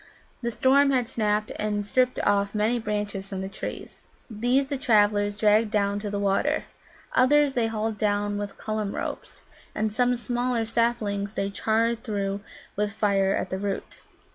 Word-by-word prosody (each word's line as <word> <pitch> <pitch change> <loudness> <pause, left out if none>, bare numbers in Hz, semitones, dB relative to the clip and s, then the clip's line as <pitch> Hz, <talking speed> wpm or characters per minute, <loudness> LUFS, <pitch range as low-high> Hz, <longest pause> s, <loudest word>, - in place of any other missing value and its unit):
The 235 - -1
storm 270 +4 +4
had 255 -3 +1
snapped 215 -3 0
and 210 -1 -1
stripped 255 +4 +1
off 200 0 +1
many 220 +3 +1
branches 205 -2 -3
from 195 -1 -5
the 190 - -3
trees. 195 - -7 0.3
These 245 +6 +2
the 275 -1 -4
travellers 205 -3 +3
dragged 215 +1 +4
down 205 -1 +1
to 205 0 -4
the 200 - -2
water. 200 -1 +1 0.5
Others 285 +2 +4
they 235 -3 +1
hauled 220 -1 -2
down 205 -1 0
with 205 -1 -5
Cullum 215 -2 -3
ropes, - - -6 0.3
and 215 -1 -1
some 245 +2 +2
smaller 240 -1 -1
saplings 220 -3 0
they 195 -1 -2
charred 230 +3 0
through 200 -3 -2 0.3
with 205 0 -1
fire 195 -2 +2
at 185 - -3
the 190 - -2
root. 200 -1 -4
210 Hz, 165 wpm, -26 LUFS, 205-235 Hz, 0.5 s, storm